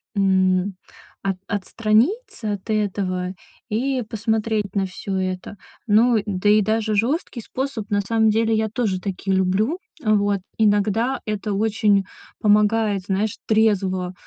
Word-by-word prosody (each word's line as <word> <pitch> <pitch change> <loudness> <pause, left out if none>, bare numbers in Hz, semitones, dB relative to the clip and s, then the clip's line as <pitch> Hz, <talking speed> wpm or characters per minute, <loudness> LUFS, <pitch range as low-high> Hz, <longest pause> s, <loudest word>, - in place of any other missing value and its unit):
м, 190 -1 +2 0.5
от 195 -1 -1
отстраниться 220 - 0
от 200 +2 -8
этого 190 -3 -1 0.4
и 255 +4 0
посмотреть 220 -2 -1
на 195 -1 +1
всё 190 +1 -4
это. 185 +1 -3 0.3
Ну 225 +3 +4
да 205 0 0
и 210 0 +6
даже 220 +1 0
жесткий 245 - -1
способ, 255 -3 -4
на 205 0 +1
самом 220 +2 +2
деле, 225 +1 +2
я 220 0 0
тоже 210 -5 -1
такие 195 0 -2
люблю. 200 - +1 0.2
Вот, 205 -2 +2 0.2
иногда 215 +4 +2
это 210 -1 -2
очень 205 -1 +2 0.4
помогает, 210 -1 +3
знаешь, 200 +2 -1
трезво 195 -4 +1
210 Hz, 125 wpm, -22 LUFS, 195-220 Hz, 0.5 s, и